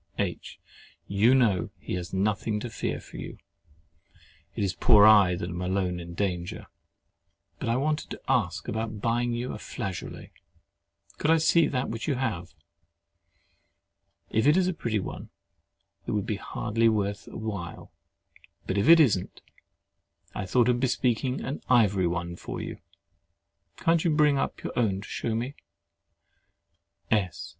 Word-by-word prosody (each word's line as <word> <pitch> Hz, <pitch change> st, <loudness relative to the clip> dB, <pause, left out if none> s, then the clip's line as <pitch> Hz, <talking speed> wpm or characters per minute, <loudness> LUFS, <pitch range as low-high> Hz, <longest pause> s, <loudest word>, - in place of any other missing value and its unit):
H. -, -, -3 dB, 0.5 s
You 110 Hz, +6 st, +4 dB
know 110 Hz, -9 st, +2 dB
he -, -, -6 dB
has 90 Hz, -1 st, -4 dB
nothing 105 Hz, +2 st, 0 dB
to 120 Hz, -, -5 dB
fear -, -, -3 dB
for -, -, -12 dB
you—it -, -, -8 dB, 1.2 s
is 95 Hz, -2 st, 0 dB
poor 105 Hz, -1 st, +6 dB
I 100 Hz, -4 st, +7 dB
that 85 Hz, -, -4 dB
am 85 Hz, +1 st, -4 dB
alone 90 Hz, -1 st, -1 dB
in 85 Hz, 0 st, -8 dB
danger. 90 Hz, -3 st, -3 dB, 0.9 s
But -, -, -2 dB
I 115 Hz, -, +2 dB
wanted 150 Hz, +4 st, -1 dB
to -, -, -7 dB
ask -, -, 0 dB
about 110 Hz, -1 st, -3 dB
buying 120 Hz, +2 st, 0 dB
you 120 Hz, +2 st, -3 dB
a -, -, -7 dB
flageolet. 95 Hz, -4 st, -6 dB, 0.9 s
Could 150 Hz, -, 0 dB
I 165 Hz, -, +6 dB
see 165 Hz, +1 st, +4 dB
that 130 Hz, -2 st, -2 dB
which 115 Hz, +4 st, -5 dB
you 145 Hz, -, +1 dB
have? 100 Hz, -10 st, -3 dB, 1.8 s
If 110 Hz, +5 st, +2 dB
it 150 Hz, +4 st, +5 dB
is 185 Hz, -1 st, +3 dB
a 185 Hz, -, 0 dB
pretty 115 Hz, -9 st, -1 dB
one, -, -, -7 dB, 0.8 s
it -, -, -1 dB
would 105 Hz, -2 st, -1 dB
hardly 115 Hz, +2 st, -2 dB
be -, -, +7 dB
worth 100 Hz, -2 st, -1 dB
while; 100 Hz, -6 st, -6 dB, 0.7 s
but 95 Hz, -, -1 dB
if 100 Hz, -, +2 dB
it 165 Hz, 0 st, +9 dB
isn't, 110 Hz, -, +2 dB, 0.9 s
I 100 Hz, -, -4 dB
thought 120 Hz, +5 st, +3 dB
of 120 Hz, -1 st, +2 dB
bespeaking 125 Hz, 0 st, 0 dB
an 140 Hz, -, -4 dB
ivory 100 Hz, -7 st, +4 dB
one 85 Hz, 0 st, -3 dB
for -, -, -6 dB
you. -, -, -6 dB, 1.0 s
Can't 165 Hz, -1 st, +2 dB
you 170 Hz, -, +2 dB
bring 150 Hz, -2 st, +3 dB
up -, -, -3 dB
your -, -, -4 dB
own 100 Hz, -5 st, +1 dB
to -, -, -10 dB
shew 115 Hz, -, -2 dB
me? 125 Hz, +5 st, -3 dB, 1.6 s
S. 95 Hz, -6 st, 0 dB
110 Hz, 150 wpm, -27 LUFS, 95-125 Hz, 1.8 s, it